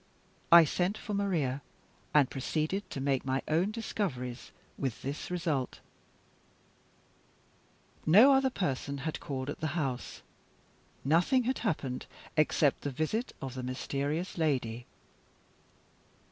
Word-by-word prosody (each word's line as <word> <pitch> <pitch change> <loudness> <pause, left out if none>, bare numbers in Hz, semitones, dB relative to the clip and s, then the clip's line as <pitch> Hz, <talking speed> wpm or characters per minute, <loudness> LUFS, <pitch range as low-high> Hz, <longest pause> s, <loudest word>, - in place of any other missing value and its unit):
I 170 -1 +10
sent 180 +7 0
for 210 - -5
Maria, 165 -10 0 0.5
and 145 -3 +5
proceeded 155 +9 -2
to - - -5
make 135 -1 +1
my 135 0 -1
own 165 +6 +2
discoveries, 175 - -3 0.3
with 130 -5 -3
this 140 +3 -4
result: 165 -7 -1 2.3
No 220 - +8
other 265 0 +4
person 140 - -2
had 160 - -2
called 130 -2 -4
at 145 - -4
the 155 +1 -2
house. 135 -6 -3 0.8
Nothing 175 - +4
had 255 +3 -1
happened, 140 - -2 0.3
except 155 -2 +3
the 145 - -2
visit 155 - -2
of 135 -2 -4
the 130 - -5
mysterious 140 +7 -3
lady. 125 -7 0
150 Hz, 120 wpm, -31 LUFS, 135-180 Hz, 2.3 s, I